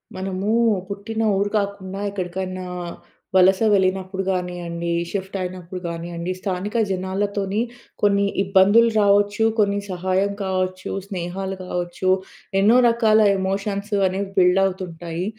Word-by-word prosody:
మనమూ 190 +2 -2 0.4
పుట్టిన 205 +3 -4 0.2
ఊరు 200 +1 +1
కాకుండా, 200 -1 -4
ఎక్కడికైనా 185 -1 -4 0.7
వలస 190 0 +6
వెళ్ళినప్పుడు 190 0 +1
గానీయండి, 175 -2 -3 0.2
షిఫ్టయినప్పుడు 185 -2 -5
గానీయండి, 170 +1 -4
స్థానిక 190 +2 -3 0.2
జనాలతోని 195 +2 -1 0.4
కొన్ని 200 -1 +3 0.2
ఇబ్బందులు 200 +4 +5
రావొచ్చు, 205 +1 +3
కొన్ని 200 -1 +2
సహాయం 185 +2 0
కావచ్చు, 185 0 -2 0.2
స్నేహాలు 190 +1 -4
కావచ్చు. 180 +1 -2 0.5
ఎన్నో 225 +5 +6
రకాల 225 -2 +3 0.2
ఎమోషన్స్ 200 +2 -2
అనేవి 190 +1 -3
బిల్డవుతుంటాయి. 180 -2 +1
190 Hz, 95 wpm, -22 LUFS, 185-200 Hz, 0.7 s, వలస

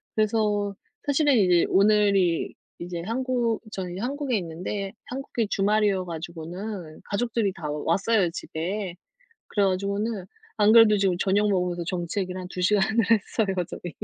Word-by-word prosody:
그래서 210 -2 +1 0.3
사실은 285 -2 +3
이제 180 -4 +4
오늘이 200 -3 +3 0.3
이제 175 0 -5
한국 240 0 0
저는 180 -3 -5
이제 190 - -5
한국에 270 -1 -1
있는데 185 +3 -4
한국이 250 -3 -3
주말이어 205 -1 +2
가지고는 170 +1 -6
가족들이 220 -2 -1
다 165 -5 -6
왔어요, 180 +6 +1
집에. 180 +4 -4 0.5
그래 205 -2 +2
가지고는 200 +2 -1 0.3
안 210 0 +5
그래도 225 -2 +7
지금 195 -2 +2
저녁 200 +2 +2
먹으면서 180 -2 0
정치 175 +1 -2
얘기를 185 0 -4
한 180 - -7
2 185 - -7
시간을 210 +3 +2
했어요, 210 -2 +1
저희. 175 - -7
200 Hz, 335 characters per minute, -25 LUFS, 180-215 Hz, 0.5 s, 그래도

